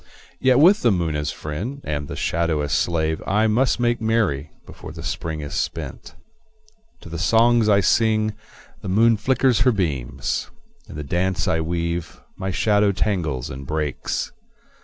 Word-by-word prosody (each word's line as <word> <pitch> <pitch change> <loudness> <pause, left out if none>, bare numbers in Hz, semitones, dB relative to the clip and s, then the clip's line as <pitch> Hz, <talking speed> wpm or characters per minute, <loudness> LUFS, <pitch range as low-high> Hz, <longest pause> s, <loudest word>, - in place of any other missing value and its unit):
Yet 130 -1 +4
with 180 +9 +6
the 120 - +4
moon 85 -5 0
as 75 -1 -1
friend 100 - -5
and 75 - -3
the - - -6
shadow 85 -2 0
as 75 -1 -2
slave 80 0 0
I 105 +3 +2
must 120 +4 +2
make 120 -1 +1
merry 105 -11 0 0.2
before - - -10
the 80 0 -9
Spring 80 -2 -4
is 70 - -6
spent. - - -4 0.9
To - - -11
the 85 0 -5
songs 115 +3 +4
I 100 -1 +5
sing 110 +2 +2 0.5
the 95 - -5
moon 115 +4 +4
flickers 125 +2 +2
her 125 +3 +4
beams; 70 - -2 0.4
In - - -9
the 75 - -5
dance 90 +5 -1
I 80 - +1
weave 85 +1 -3 0.2
my 95 0 -4
shadow 105 +1 +2
tangles 85 - -1
and 65 +1 -8
breaks. 75 -3 -2
90 Hz, 160 wpm, -22 LUFS, 80-110 Hz, 0.9 s, with